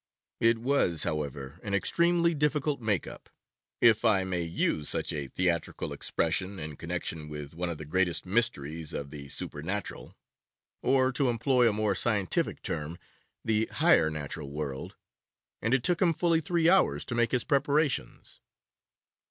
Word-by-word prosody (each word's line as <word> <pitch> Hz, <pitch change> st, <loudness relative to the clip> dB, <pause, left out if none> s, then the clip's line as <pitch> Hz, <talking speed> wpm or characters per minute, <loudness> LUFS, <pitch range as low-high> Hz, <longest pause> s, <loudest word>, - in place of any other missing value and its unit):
It 115 Hz, 0 st, +4 dB
was, 115 Hz, -, +1 dB
however, 75 Hz, -1 st, -4 dB
an 100 Hz, -1 st, -2 dB
extremely 170 Hz, +9 st, +2 dB
difficult 150 Hz, -2 st, 0 dB
'make 105 Hz, -5 st, 0 dB
up,' -, -, -11 dB, 0.5 s
if 115 Hz, -3 st, +5 dB
I 105 Hz, -5 st, +4 dB
may 90 Hz, -2 st, -2 dB
use 80 Hz, -2 st, -1 dB
such -, -, -1 dB
a 75 Hz, -3 st, -3 dB
theatrical 85 Hz, +3 st, -1 dB
expression 95 Hz, +1 st, -1 dB
in 75 Hz, -2 st, -6 dB
connection 75 Hz, +2 st, -4 dB
with 75 Hz, -1 st, -7 dB
one 85 Hz, +2 st, -3 dB
of 85 Hz, -, -4 dB
the 75 Hz, -, -8 dB
greatest 90 Hz, +3 st, +1 dB
mysteries 85 Hz, -, -1 dB
of 70 Hz, 0 st, -5 dB
the 70 Hz, -2 st, -9 dB
supernatural, 90 Hz, +9 st, -5 dB, 0.6 s
or, 130 Hz, 0 st, +3 dB
to 130 Hz, 0 st, +1 dB
employ 120 Hz, +1 st, +3 dB
a -, -, -1 dB
more 105 Hz, -1 st, +1 dB
scientific 100 Hz, -4 st, 0 dB
term, 80 Hz, +1 st, -3 dB, 0.5 s
the 110 Hz, 0 st, +1 dB
higher 80 Hz, -, +4 dB
natural 75 Hz, -2 st, -5 dB
world, 70 Hz, -2 st, -5 dB, 0.7 s
and 115 Hz, -, 0 dB
it 130 Hz, -2 st, +2 dB
took 175 Hz, -1 st, +1 dB
him 175 Hz, -3 st, +4 dB
fully 165 Hz, 0 st, +2 dB
three 165 Hz, +1 st, +1 dB
hours 190 Hz, +2 st, +3 dB
to -, -, -4 dB
make 120 Hz, 0 st, +2 dB
his 125 Hz, -, +1 dB
preparations. 145 Hz, +1 st, 0 dB
100 Hz, 150 wpm, -29 LUFS, 80-130 Hz, 0.7 s, if